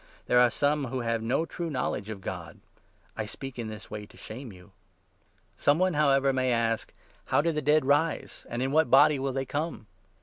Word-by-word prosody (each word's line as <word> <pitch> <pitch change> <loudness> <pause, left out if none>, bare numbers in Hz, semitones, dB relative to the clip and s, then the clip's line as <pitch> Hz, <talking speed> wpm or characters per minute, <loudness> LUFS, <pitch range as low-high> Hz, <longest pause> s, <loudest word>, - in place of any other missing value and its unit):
There 125 - +4
are 125 0 +6
some 145 +3 +1
who 130 0 -3
have 115 -1 -1
no 130 +8 0
true 170 0 -5
knowledge 125 -7 -2
of 105 -3 -6
God. - - -7 0.6
I 110 - -3
speak 135 +3 -7
in 115 - -3
this 110 -2 -9
way 105 -1 -6
to - - -19
shame 120 +2 -8
you. 90 +1 -16 0.9
Some 145 +1 +4
one, 185 0 +2
however, 140 -2 +3
may 130 -1 +1
ask 115 -1 0 0.2
' - - -32
How 130 - +2
do 165 +3 +2
the 155 -1 -2
dead 150 0 +3
rise? 145 +3 0
and 120 +2 -2
in 135 - -1
what 155 +2 +3
body 150 -1 +6
will 135 0 -1
they 135 0 -2
come 145 -3 -3
135 Hz, 210 wpm, -28 LUFS, 115-150 Hz, 0.9 s, are